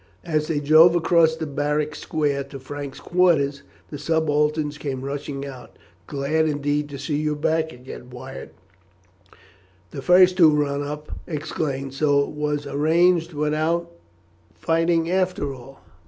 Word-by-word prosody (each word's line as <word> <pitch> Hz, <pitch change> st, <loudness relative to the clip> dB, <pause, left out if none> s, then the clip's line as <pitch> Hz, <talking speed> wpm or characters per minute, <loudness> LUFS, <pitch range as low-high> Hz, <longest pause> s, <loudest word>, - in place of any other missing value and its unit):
As 155 Hz, -2 st, 0 dB
they 155 Hz, -3 st, 0 dB
drove 155 Hz, +4 st, +6 dB
across 165 Hz, -1 st, +3 dB
the 160 Hz, -, -4 dB
barrack 150 Hz, +1 st, -1 dB
square 145 Hz, -2 st, -1 dB
to 140 Hz, 0 st, -10 dB
Frank's 140 Hz, +1 st, -7 dB
quarters 155 Hz, -6 st, +2 dB, 0.3 s
the 145 Hz, -, -6 dB
subalterns 150 Hz, -1 st, 0 dB
came 135 Hz, -2 st, -4 dB
rushing 140 Hz, 0 st, -5 dB
out. 130 Hz, -3 st, -11 dB, 0.3 s
"Glad 150 Hz, +3 st, 0 dB
indeed 145 Hz, 0 st, -1 dB
to 140 Hz, -, -7 dB
see 145 Hz, +2 st, -2 dB
you 150 Hz, 0 st, -1 dB
back 160 Hz, +2 st, 0 dB
again, 125 Hz, 0 st, -11 dB
Wyatt," 130 Hz, +2 st, -9 dB, 1.4 s
the 135 Hz, -, -6 dB
first 180 Hz, +4 st, +5 dB
who 155 Hz, -3 st, +7 dB
run 140 Hz, -1 st, -1 dB
up 150 Hz, +1 st, -6 dB, 0.2 s
exclaimed; 145 Hz, -4 st, -3 dB
"so 140 Hz, 0 st, +2 dB
it -, -, -5 dB
was 150 Hz, -1 st, -2 dB
arranged 165 Hz, +4 st, +2 dB
without 155 Hz, +3 st, -1 dB, 0.6 s
fighting 165 Hz, 0 st, +1 dB
after 180 Hz, -6 st, 0 dB
all?" 135 Hz, +1 st, -13 dB
150 Hz, 140 wpm, -23 LUFS, 140-160 Hz, 1.4 s, who